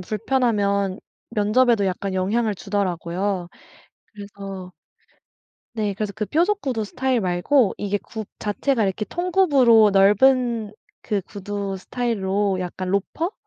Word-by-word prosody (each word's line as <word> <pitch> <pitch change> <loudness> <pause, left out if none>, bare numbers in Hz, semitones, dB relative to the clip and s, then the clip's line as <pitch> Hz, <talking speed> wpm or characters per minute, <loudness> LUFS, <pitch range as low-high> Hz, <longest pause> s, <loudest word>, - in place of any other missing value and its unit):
불편하면 200 -2 0 0.3
면접에도 215 +1 +3
약간 190 +1 -2
영향을 210 +4 0
주더라고요. 185 -1 -2 0.6
그래서 195 -3 -9 1.0
네 210 -3 -1
그래서 205 +1 -3
그 215 -1 -3
뾰족 355 +6 +1
구두 240 - -2
스타일 255 +3 -1
말고 190 +7 +2
이게 205 0 -1
굽 220 0 -8
자체가 225 +3 0
이렇게 195 +2 -1
통굽으로 280 - +4
넓은 225 +3 +3 0.3
그 205 -2 -1
구두 200 +1 -5
스타일로 200 -4 -1
약간 185 +1 -4
로퍼? 260 - -1
205 Hz, 270 characters per minute, -22 LUFS, 195-240 Hz, 1.0 s, 통굽으로